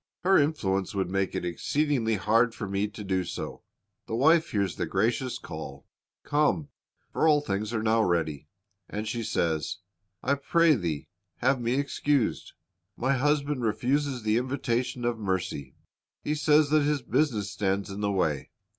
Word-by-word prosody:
Her 190 +1 +5
influence 100 - 0
would 95 -2 -1
make 95 -1 0
it - - -2
exceedingly 120 - 0
hard 115 +4 +2
for 105 - -5
me 100 +1 0
to 105 0 -9
do 95 -2 0
so." - - -6 0.5
The 110 - -2
wife 160 +6 +4
hears 100 -5 0
the - - -1
gracious 115 +6 0
call, 70 0 -8 0.4
"Come; 150 0 +1 0.4
for - - +2
all 150 -2 +5
things 105 -6 -2
are 110 -2 -1
now 110 0 +3
ready," 80 -6 0 0.4
and 105 +2 -4
she 115 +2 -2
says, 80 -7 -1 0.5
"T 140 - +4
pray 170 +2 +4
thee 85 - -2 0.3
have 130 0 +1
me 120 +2 0
excused.' 140 -2 0 0.4
My 130 +3 +1
husband 145 0 +1
refuses 125 +4 0
the 110 +1 +2
invitation 125 -1 -1
of 120 -2 0
mercy. 90 -9 -3 0.5
He 150 - 0
says 150 -1 +3
that 155 0 +5
his 145 -2 0
business 120 -6 0
stands 100 0 -1
in 100 +1 -5
the 100 -1 +1
way. 80 -8 0
115 Hz, 160 wpm, -28 LUFS, 95-140 Hz, 0.5 s, Her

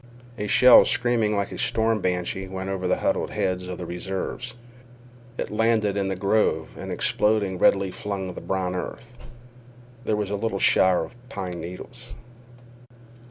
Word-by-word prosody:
A 105 - -2
shell 125 +4 +8
screaming 120 -4 +1
like 100 0 -1
a - - -7
storm 110 -1 +1
banshee 90 +1 -2
went 95 +1 -5
over 95 -1 -2
the - - +2
huddled - - 0
heads 90 -1 -2
of 90 -1 -5
the 90 - -6
reserves. 95 +8 -5 0.8
It - - -4
landed 110 -2 +2
in 100 -1 0
the 95 - -1
grove, 100 +4 +1
and - - -7
exploding 105 -4 +1
redly 95 -1 +3
flung 95 -2 -4
the - - -8
brown 95 -1 -2
earth. 120 +6 -6 0.9
There 110 - +1
was 105 -2 -2
a - - 0
little 110 -1 -2
shower 95 -2 +4
of 80 - -10
pine 90 -8 -5
needles. 115 +7 -9
100 Hz, 160 wpm, -24 LUFS, 95-110 Hz, 0.9 s, shell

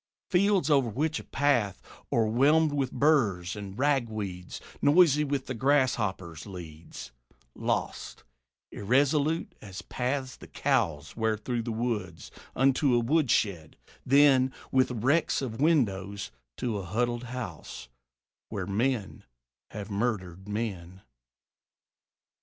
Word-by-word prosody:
Fields 190 -3 +3
over 135 -5 +3
which 150 +8 -1
a - - -9
path, 125 -9 +1 0.3
o'erwhelmed 140 +8 +3
with 135 -3 -1
burs 110 - +2
And 100 -1 -8
ragweeds, 110 -10 -1 0.2
noisy 150 0 +5
with 140 -2 -2
the 130 - -4
grasshoppers, 110 - 0
Leads, 85 -7 -9 0.4
lost, - - -3 0.5
irresolute 140 +8 +1
as 95 -3 -8
paths 130 0 -3
the - - -12
cows 75 -1 -1
Wear 110 -1 0
through 120 +2 -3
the 115 +1 -4
woods, 110 -8 -3 0.2
unto 135 0 +3
a - - +4
woodshed; 115 - 0 0.3
then, 135 -1 +5 0.2
With 130 -1 +3
wrecks 130 +7 +1
of 130 -2 -5
windows, 100 - +1 0.3
to 115 -5 -2
a - - -5
huddled 120 +6 -1
house, 115 - -7 0.6
Where 95 -3 -4
men 110 +2 -1 0.5
have 105 -1 -7
murdered 100 -4 -2
men. 95 -4 -4
120 Hz, 110 wpm, -28 LUFS, 100-140 Hz, 0.6 s, noisy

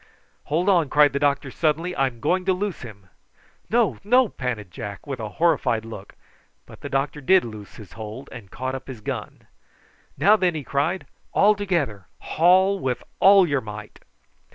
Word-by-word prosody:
"Hold 165 +6 -1
on!" 175 -7 +3
cried 145 0 +4
the 140 - 0
doctor 140 -1 0
suddenly. 165 +4 -1
"I'm 130 -4 -1
going 185 +7 +1
to 190 - +3
loose 195 -1 -3
him." 105 -5 -11 0.6
"No, 235 0 +1
no!" 245 +3 +4
panted 115 -7 -5
Jack, 100 +2 -8
with 135 -4 -5
a 110 -2 -4
horrified 135 -9 +1
look; 105 -3 -10 0.5
but - - -15
the - - -6
doctor 140 +2 -2
did 185 +5 +4
loose 110 -3 -10
his 105 -5 -13
hold 110 +5 -8
and 110 -6 -10
caught 130 +4 -4
up 135 - -7
his 125 -5 -9
gun. - - -6 0.7
"Now, 210 +2 +5
then," 180 -4 +1
he 150 - -4
cried. 145 +8 -1 0.3
"All 210 +2 +5
together. 170 - -2
Haul 190 +4 +3
with 130 -5 -2 0.2
all 195 -1 +7
your 140 -3 0
might." 105 -1 -9
140 Hz, 175 wpm, -23 LUFS, 115-185 Hz, 0.7 s, all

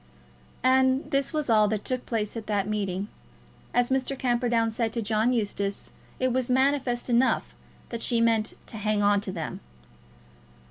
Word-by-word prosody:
And 260 +1 +3
this 275 0 +1
was 305 -2 -1
all 215 -3 +4
that 210 0 -2
took 255 -1 -3
place 215 -2 -2
at 225 -2 -6
that 205 -2 0
meeting. 200 -2 -2 0.6
As 245 +1 +1
Mr. 265 +1 0
Camperdown 240 -2 +1
said 225 0 -1
to 235 - -1
John 220 +3 +2
Eustace, 200 -4 -2 0.3
it 255 -1 +1
was 255 -1 0
manifest 260 -1 +1
enough 245 +1 +2 0.4
that 230 -1 -5
she 235 -2 +2
meant 225 -2 +2
"to 220 - -7
hang 210 0 0
on 205 0 +3
to 200 - -3
them." 165 -4 -5
230 Hz, 160 wpm, -26 LUFS, 210-255 Hz, 0.6 s, all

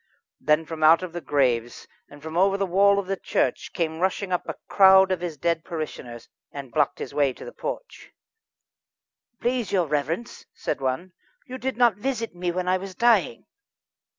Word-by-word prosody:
Then 150 +2 +2
from 160 0 -7
out 160 +3 +6
of 180 -2 -6
the 175 - -5
graves, 125 -5 0 0.2
and 145 0 -15
from 160 0 -7
over 195 +2 +3
the 200 - 0
wall 200 +2 +4
of 200 - -1
the 195 +1 -2
churchyard, - - -1
came 160 -1 -2
rushing 190 +1 -1
up 180 - -2
a - - -3
crowd 190 -1 +6
of 185 -2 -1
his 170 -4 -4
dead 170 +1 0
parishioners, 155 -9 -7 0.2
and 140 -3 -8
blocked 145 +1 +1
his - - -7
way 140 -2 +2
to - - -11
the - - -8
porch. - - -7 1.3
"Please, 245 -2 -1
your 185 -3 +2
reverence!" 150 - -3
said - - -3
one, 135 +8 -2 0.3
"you 255 -2 -8
did 260 -1 -3
not 240 -3 +4
visit 230 -1 -3
me 175 0 -3
when 180 +1 -3
I 185 +1 +3
was 190 0 -8
dying." 235 +2 +2
175 Hz, 185 wpm, -24 LUFS, 150-195 Hz, 1.3 s, out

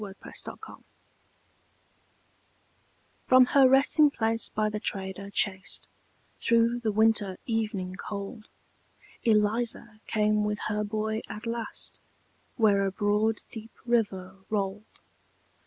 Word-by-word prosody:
ELIZA 195 -1 -9
CROSSING - - -8
THE - - -24 0.2
RIVER - - -29 2.4
From 255 0 +7
her 270 -2 +7
resting 285 +3 +5
place 225 -4 0
by 215 0 0
the 210 0 -3
trader 195 -1 -3
chased, 190 -1 0 0.5
Through 235 +1 +3
the 225 -3 -1
winter 210 -3 +2
evening 210 -5 -2
cold, 205 +3 -7 0.7
Eliza 220 0 +1
came 210 -1 +2
with 210 0 -1
her 210 0 -1
boy 220 +1 -2
at 215 +2 -7
last, 230 0 -4 0.5
Where 205 -4 +3
a - - -2
broad 210 +2 +1
deep 225 -1 -7
river 195 -6 -1
rolled. 205 0 -2
215 Hz, 115 wpm, -28 LUFS, 205-230 Hz, 2.4 s, From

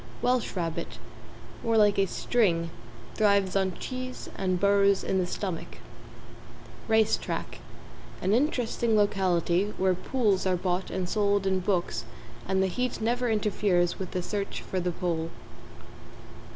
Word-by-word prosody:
=WELSH 250 -3 +1
RABBIT= 165 -3 -3 0.7
More 230 -1 +2
like 205 -2 +4
a 195 - +3
string, 170 -7 +1 0.4
thrives 200 -3 +2
on 190 -2 +1
cheese 255 0 -6
and 185 -2 0
burrows 200 0 +4
in 190 - 0
the 180 - 0
stomach. 180 -2 -5 1.1
=RACE 220 -1 +4
TRACK= - - -5 0.6
An 190 +3 +1
interesting 235 -4 +1
locality, 190 -1 +1
where 190 0 +3
pools 200 -1 0
are 185 -1 +2
bought 180 +1 -1
and 185 -1 -2
sold 200 0 +1
in 190 -1 +2
books 180 -1 -1 0.4
and 190 0 +2
the - - +2
heat 250 +7 -2
never 240 +2 0
interferes 200 -5 +1
with 190 - -4
the 180 - -3
search 200 +1 -3
for 185 - -3
the 180 0 -1
Pole. 165 -2 -2
195 Hz, 140 wpm, -28 LUFS, 180-215 Hz, 1.1 s, like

